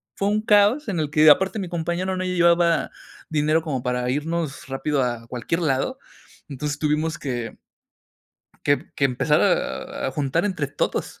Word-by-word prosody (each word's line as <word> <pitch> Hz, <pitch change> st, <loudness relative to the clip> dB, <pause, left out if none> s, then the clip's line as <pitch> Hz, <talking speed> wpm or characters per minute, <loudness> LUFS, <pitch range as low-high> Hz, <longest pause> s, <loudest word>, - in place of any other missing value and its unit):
fue 200 Hz, -, -1 dB
un 210 Hz, +1 st, +1 dB
caos. 215 Hz, +5 st, +3 dB
En 175 Hz, -5 st, -1 dB
el 150 Hz, -2 st, -1 dB
que 155 Hz, 0 st, +4 dB
aparte, 190 Hz, +7 st, +4 dB
mi 185 Hz, -, -4 dB
compañero, 175 Hz, +2 st, -2 dB
no 185 Hz, -, -2 dB
llevaba 170 Hz, -2 st, +3 dB, 0.4 s
dinero, 155 Hz, +1 st, +1 dB
como 135 Hz, -6 st, -2 dB
para 125 Hz, 0 st, -1 dB
irnos 155 Hz, 0 st, -3 dB
rápido, 135 Hz, +1 st, -1 dB
a 120 Hz, -2 st, -3 dB
cualquier 125 Hz, +9 st, -3 dB
lado. 155 Hz, -, 0 dB, 0.5 s
Entonces, 145 Hz, +2 st, -4 dB
tuvimos 155 Hz, +1 st, 0 dB
que 120 Hz, -5 st, -5 dB, 1.1 s
que 145 Hz, -, +4 dB
emp 145 Hz, -, 0 dB, 0.2 s
que 140 Hz, -, +2 dB
empezar 125 Hz, -2 st, +1 dB
a -, -, -1 dB
a -, -, -1 dB
juntar, 145 Hz, +5 st, -1 dB
entre 185 Hz, -8 st, -1 dB
todos. 145 Hz, -, -3 dB
155 Hz, 165 wpm, -23 LUFS, 135-175 Hz, 1.1 s, que